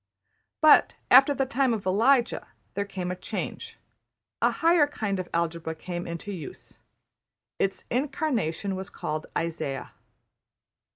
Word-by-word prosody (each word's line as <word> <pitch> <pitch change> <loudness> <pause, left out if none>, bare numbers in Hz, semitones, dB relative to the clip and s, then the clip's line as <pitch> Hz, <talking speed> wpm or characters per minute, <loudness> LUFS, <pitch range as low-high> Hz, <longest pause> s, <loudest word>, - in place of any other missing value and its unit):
But, 310 -1 +6 0.2
after 270 +3 +8
the 275 -1 +1
time 265 -2 +1
of 205 - -7
Elijah, 235 +6 +3 0.3
there 200 +1 -1
came 185 -3 -4
a - - -3
change. 180 - -5 0.6
A - - +5
higher 330 -2 +4
kind 215 -9 -2
of 185 - -5
algebra 165 -1 -2
came 175 +1 -5
into 170 +4 -5
use. 170 -7 -9 0.8
Its 195 0 -1
incarnation 245 - -1
was 190 0 -5
called 155 +1 -4
Isaiah. 160 -5 -3
195 Hz, 125 wpm, -27 LUFS, 170-265 Hz, 0.8 s, after